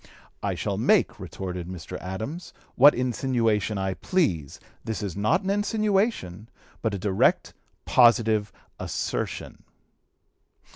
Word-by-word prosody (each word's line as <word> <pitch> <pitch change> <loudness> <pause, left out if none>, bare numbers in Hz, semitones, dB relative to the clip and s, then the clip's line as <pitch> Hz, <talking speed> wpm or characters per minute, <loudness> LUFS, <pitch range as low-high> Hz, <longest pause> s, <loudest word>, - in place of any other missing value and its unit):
"I - - -1
shall - - -2
make," - - +2
retorted 90 -2 -6
Mr. 90 0 -7
Adams, 110 - -6 0.2
"what 145 +4 +7
insinuation 120 -4 0
I 95 -1 -1
please. 95 - -1 0.2
This 110 -1 -4
is 95 -5 -4
not 105 - +1
an 190 - 0
insinuation, 205 - 0 0.3
but 110 -3 -1
a - - -2
direct, 95 0 +1 0.3
positive 110 -4 +4 0.3
assertion." - - -4
110 Hz, 110 wpm, -26 LUFS, 95-140 Hz, 0.3 s, what